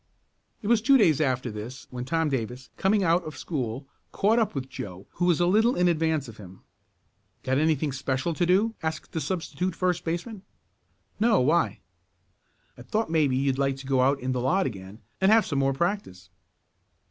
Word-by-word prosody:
It - - -4
was 230 -1 +4
two 270 +5 +5
days 165 - +3
after 130 -4 0
this 110 +5 -8
when 125 0 -5
Tom 160 +2 0
Davis, 125 -1 -4
coming 195 +1 +2
out 170 +1 +2
of 155 -2 -8
school, 130 -4 -4 0.3
caught 220 +4 +2
up 220 - 0
with 130 -1 -3
Joe 100 -7 -8
who 175 - -1
was 175 -2 +3
a 175 - +3
little 220 +7 +3
in 180 0 +2
advance 160 -4 +1
of 115 - -11
him. 95 -2 -13 0.8
"Got 130 +1 +1
anything 155 -1 +1
special 135 +3 -2
to 175 +2 0
do?" 205 +5 +3
asked 160 -1 -4
the 160 - -3
substitute 180 0 -3
first 180 -1 0
baseman. 175 +6 -4 0.8
"No, 220 -1 +4
why?" 135 - +1 1.0
"I - - -9
thought 210 - -2
maybe 145 -5 +2
you'd 135 0 0
like 135 -1 +1
to 135 0 -11
go 130 -1 +2
out 135 +2 +2
in 130 +1 -2
the 125 -1 -1
lot 185 +10 +2
again, 100 -1 -7 0.2
and 190 +2 +5
have 220 -2 +5
some 140 - -1
more 135 0 +2
practice." 135 - -3
155 Hz, 190 wpm, -26 LUFS, 130-180 Hz, 1.0 s, two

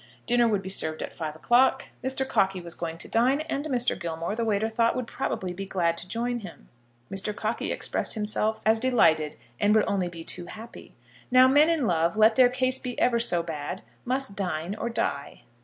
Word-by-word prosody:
Dinner 240 0 +3
would 205 -3 0
be 190 - -5
served 160 -4 +3
at - - -7
five 155 -2 -5
o'clock. 240 +10 +2
Mr. 265 0 -1
Cockey 190 -6 +1
was 170 -1 -5
going 165 -1 -5
to - - -4
dine, 255 +6 +2
and 310 -2 -3
Mr. 250 -5 0
Gilmore, 170 +2 -4
the 230 - -1
waiter 220 -1 +1
thought, 230 +1 +1
would 255 -1 -2
probably 190 -7 -3
be 195 +2 -6
glad 170 -3 0
to 170 - -7
join 240 +4 -2
him. 190 -6 -12 0.4
Mr. 200 +2 -1
Cockey 220 +1 -2
expressed - - -2
himself 215 0 -1
as 220 +1 +4
delighted, 160 -12 +3 0.2
and 210 +1 +3
would 215 - +4
only 190 -3 0
be 170 -1 -8
too 175 +1 -3
happy. 225 +4 -11 0.3
Now 255 0 +7
men 290 +4 +5
in 320 -6 +1
love, 170 0 +1
let 220 +1 +5
their 255 -1 +6
case 255 +1 +1
be 250 -2 -5
ever 235 -1 +3
so 175 -7 +2
bad, 160 +3 -5 0.2
must 255 -4 -2
dine 180 -2 -3
or 220 +2 -4
die. 140 -11 -3
215 Hz, 205 wpm, -26 LUFS, 175-245 Hz, 0.4 s, Now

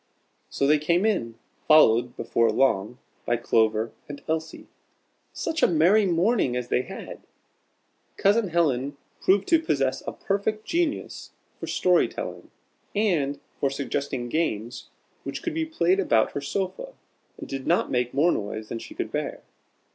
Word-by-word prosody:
So 140 - -1
they 150 +2 +4
came 170 +6 +1
in, 120 - 0 0.3
followed, 120 -6 +5
before 115 0 +1
long, 120 -3 +1 0.3
by 120 - 0
Clover 110 -1 +1 0.2
and 145 -1 -7
Elsie. 160 0 -3 0.7
Such 325 -1 -3
a - - +6
merry 180 +6 +4
morning 175 - +2
as 125 -1 -3
they - - +2
had! - - -9 1.0
Cousin 205 +2 +3
Helen 145 -5 0 0.2
proved 195 +1 +3
to 330 -1 +5
possess 135 - 0
a - - -3
perfect 215 +2 -2
genius 335 -3 -2 0.3
for - - -6
story 180 -1 +3
telling, - - -7 0.5
and 165 -10 +1 0.2
for 140 - +2
suggesting 135 -2 -3
games 120 -6 -2 0.3
which - - -6
could 340 - -2
be 325 0 -1
played 190 - +2
about 115 -12 +2
her 145 - -4
sofa, 195 - -4 0.4
and - - -8
did 135 -1 -5
not - - +2
make 125 -1 0
more 155 +6 +3
noise 105 +1 -4
than 115 - -4
she - - -10
could - - -4
bear. - - -4
150 Hz, 150 wpm, -25 LUFS, 125-195 Hz, 1.0 s, a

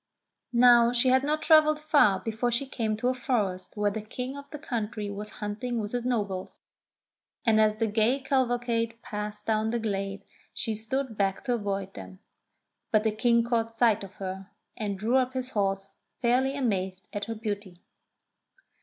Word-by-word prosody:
Now 240 -1 +7
she 245 +1 +2
had 260 +1 +4
not 305 +2 0
travelled 305 -1 +5
far 290 -11 +4
before 225 +3 -1
she 240 +4 0
came 225 -5 -2
to 245 +3 +1
a - - +2
forest 210 -8 -2
where 205 0 +2
the 220 +1 -4
King 250 +5 -5
of 280 0 -10
the 300 - -7
country 220 -7 -3
was 210 +1 -6
hunting 235 +3 -3
with 210 -1 -4
his 245 -1 -2
nobles, 205 -7 -2 0.9
and 220 -2 +5
as 215 -1 +3
the 225 +1 0
gay 220 +5 +2
cavalcade 240 -4 0
passed 210 0 -5
down 220 0 +1
the 235 - 0
glade 195 -3 -3 0.3
she 225 - -1
stood 225 +2 -3
back 195 -1 0
to 250 -2 0
avoid 200 -3 -2
them; 95 -1 -10 0.7
but 215 -1 +3
the 220 - +2
King 235 +2 +3
caught 230 -1 -1
sight 225 -4 +3
of 195 0 -10
her, 190 0 -6 0.3
and 205 -3 -3
drew 225 +6 +2
up 255 0 +1
his 260 0 -3
horse, 195 -1 -1 0.3
fairly 260 +3 +2
amazed 190 -7 -1
at 205 0 -2
her 225 - -4
beauty. 205 -4 -4
225 Hz, 175 wpm, -28 LUFS, 205-250 Hz, 0.9 s, Now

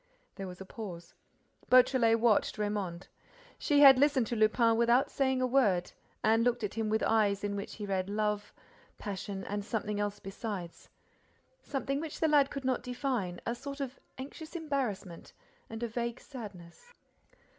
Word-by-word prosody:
There 195 -2 -6
was 180 -1 -9
a 190 - -8
pause. 180 -5 -8 0.6
Beautrelet 250 -3 +5
watched 225 -2 +2
Raymonde. 205 -4 -3 0.5
She 290 -2 +3
had 270 -2 +9
listened 280 -3 +3
to 235 - -3
Lupin 225 +1 +4
without 235 +4 +3
saying 265 -2 +1
a - - +4
word 215 -9 +2 0.3
and 225 +1 +4
looked 240 -1 +1
at 205 - -2
him 225 -1 -2
with 220 +1 +1
eyes 205 -3 +2
in 205 0 -1
which 200 0 -5
he 210 - -5
read 190 -1 -1
love, 210 0 -1 0.5
passion 195 -1 -5
and 205 0 -3
something 210 -1 -2
else 205 0 -1
besides, 195 -3 -7 0.7
something 275 0 -2
which 320 -2 -6
the 320 - +3
lad 290 -3 +4
could 275 -2 -6
not 255 -2 +1
define, 245 -8 -2
a 235 - 0
sort 275 +3 -7
of 270 -1 -5 0.2
anxious 310 +5 -9
embarrassment 260 - -3 0.4
and 225 +1 -6
a - - 0
vague 235 +1 -3
sadness. 210 - -11
225 Hz, 165 wpm, -31 LUFS, 205-260 Hz, 0.7 s, had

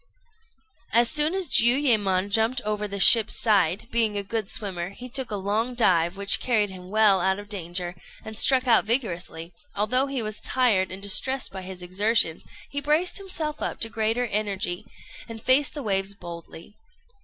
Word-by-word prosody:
As 235 +1 +4
soon 305 +4 +3
as 380 -3 -2
Jiuyémon 220 -7 +2
jumped 225 +4 +2
over 210 -1 -3
the 200 0 -6
ship's 220 +2 +7
side, 200 -2 +1
being 225 -3 0
a 200 - -3
good 215 0 -4
swimmer, 185 -5 -4
he 245 +6 -10
took 255 0 -3
a 210 - -4
long 210 +5 -2
dive, 180 -5 +1
which 200 0 +2
carried 215 -5 0
him 180 -1 -11
well 205 -2 +3
out 190 +1 +1
of 205 0 -11
danger, 175 -3 -4 0.3
and 220 0 -8
struck 255 +3 +3
out 230 -2 +5
vigorously; 195 -8 -2
and 170 - -17 0.2
although 250 +7 0
he 270 -4 -3
was 215 0 -6
tired 230 -8 +1
and 190 +1 -8
distressed 260 +6 +1
by 190 0 -7
his 185 -1 -8
exertions, 185 -2 +2 0.3
he 285 - -3
braced 310 +7 0
himself 320 -6 -4
up - - -4
to 225 - -1
greater 225 +2 -1
energy, 200 -3 -3 0.4
and 225 -1 -9
faced 265 +4 +3
the 290 - -5
waves 195 -2 -2
boldly. 170 0 -11
215 Hz, 180 wpm, -24 LUFS, 190-245 Hz, 0.4 s, ship's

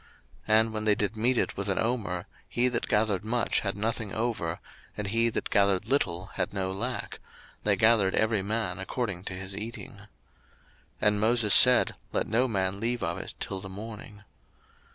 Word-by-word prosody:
02:016:018 110 0 +5
And 110 0 0
when 110 0 -3
they 105 -1 +4
did 105 +1 -1
mete 120 +3 +1
it - - 0
with 100 +1 -3
an 95 - 0
omer, 110 -7 -2 0.2
he 120 +1 +2
that 120 -1 -2
gathered 105 -3 +1
much 120 +2 0
had 100 -1 -3
nothing 110 -1 -2
over, 110 -8 -2 0.4
and 105 - -3
he 115 +2 +2
that - - -4
gathered 100 -2 +2
little 95 -9 -1
had - - -3
no 95 -1 -1
lack; 120 +6 -4 0.4
they 105 -1 +2
gathered 105 -2 +3
every 110 -2 +1
man 100 -2 -3
according 95 -2 -4
to - - -5
his 95 +1 -4
eating. 110 +3 -6
02:016:019 100 - -15 1.0
And 105 0 +2
Moses 110 -1 +3
said, 125 0 +8 0.2
Let - - 0
no 120 +4 +1
man 95 -3 -1
leave 120 +2 -1
of 85 +1 -2
it - - -8
till 95 - -3
the 95 - -8
morning. 105 +1 -9
105 Hz, 185 wpm, -27 LUFS, 95-115 Hz, 1.0 s, said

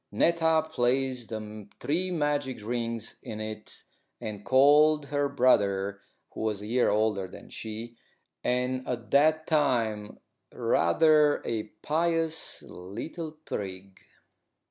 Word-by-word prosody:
Netta 160 -1 +3
placed 130 -4 0
the 110 -2 -7
three 175 +6 0
magic 145 - -1
rings 115 -1 -3
in 110 - -7
it, 110 0 -7 0.4
and 105 -3 -6
called 145 +4 +5
her 145 0 0
brother, 100 -7 +2 0.3
who - - -7
was 110 -2 -1
a 105 - -7
year 120 +3 +2
older 105 -2 +1
than - - -13
she, 115 +2 -7 0.5
and 125 +1 0
at 120 -2 -4
that 155 +2 +4
time 115 -9 0 0.3
rather 150 - +3
a 110 -2 -2 0.2
pious 165 0 0
little 135 - -7
prig. 95 -1 -6
125 Hz, 115 wpm, -28 LUFS, 110-150 Hz, 0.5 s, called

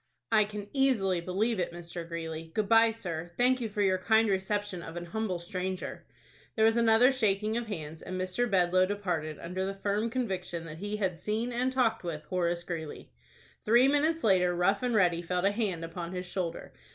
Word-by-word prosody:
"I 215 -2 +5
can 205 -1 -7
easily 220 -10 +2
believe 200 +5 0
it, 175 - -1
Mr. 170 0 -7
Greeley. 165 -1 -6
Good 215 -2 +1
by, 225 +1 +6
sir. 175 -7 -5
Thank 255 +1 +3
you 225 - -2
for 205 0 -1
your 185 -1 +2
kind 220 +3 +3
reception 195 -1 -1
of 165 0 -8
an 175 0 -5
humble 205 0 -2
stranger." 185 +1 -4 0.5
There 220 - +4
was 225 0 +4
another 230 +2 +5
shaking 215 -4 +1
of 235 -1 -2
hands, 160 -6 -6
and 185 0 -5
Mr. 185 +6 0
Bedloe 185 -1 +3
departed 175 -7 -2
under 180 +2 -4
the 195 +1 -3
firm 205 +3 -1
conviction 190 -8 -3
that 160 -1 -8
he 205 +2 -3
had 185 -5 -1
seen 220 +6 -2
and 250 +2 0
talked 235 -5 +1
with 160 -3 -4
Horace 175 0 -1
Greeley. 160 -3 -6 0.5
Three 240 +4 +5
minutes 310 +3 +2
later, 180 -4 +3
Rough 185 +3 +2
and 250 -2 0
Ready 175 -4 +3
felt 180 +2 -1
a 200 - +4
hand 200 -6 -2
upon 170 +1 -6
his 180 0 -4
shoulder. 175 -2 -4
195 Hz, 195 wpm, -30 LUFS, 175-220 Hz, 0.5 s, by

